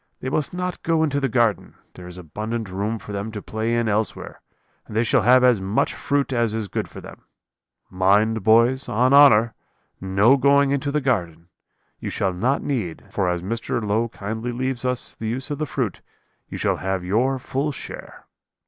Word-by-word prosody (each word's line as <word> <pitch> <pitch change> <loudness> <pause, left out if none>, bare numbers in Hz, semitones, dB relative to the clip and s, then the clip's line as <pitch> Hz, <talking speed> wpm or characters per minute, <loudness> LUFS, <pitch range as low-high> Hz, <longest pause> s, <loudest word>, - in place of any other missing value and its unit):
They 130 - -4
must 140 0 -1
not 180 0 -4
go 165 -1 +1
into 140 -2 0
the 135 -1 0
garden, 115 -3 0 0.2
there 90 - -11
is 90 0 -10
abundant 105 +5 -5
room 105 +4 -2
for 105 - -10
them 100 +2 -4
to 105 - -4
play 110 +3 -2
in 120 -1 0
elsewhere, 110 +1 -2 0.5
and 105 - -9
they 115 - +3
shall 115 - +2
have 125 +2 +5
as 125 -6 +4
much 95 +3 0
fruit 140 -1 -1
as 115 -3 0
is 110 -2 -3
good - - -3
for - - -11
them. - - -12 0.7
Mind, 105 +4 +2
boys, 115 +6 +3
on 125 +5 +2
honour, 115 -5 +6 0.5
no 100 +8 +4
going 140 +1 +4
into 140 0 -1
the 150 +1 0
garden. 85 - -2 0.5
You - - -5
shall 95 -2 -1
not 125 +10 0
need, 110 - -3
for 95 -2 0
as 90 -1 -2
Mr. 115 +4 -2
Low 110 +2 0
kindly 110 +4 -5
leaves 130 0 -3
us 125 -1 -1
the 110 - -6
use 130 +6 -3
of 145 - -3
the 155 - -2
fruit, 125 -9 -3 0.5
you - - -6
shall - - 0
have 95 -1 -3
your 125 +8 +1
full 135 +3 -2
share.' - - -9
115 Hz, 195 wpm, -22 LUFS, 100-130 Hz, 0.7 s, honour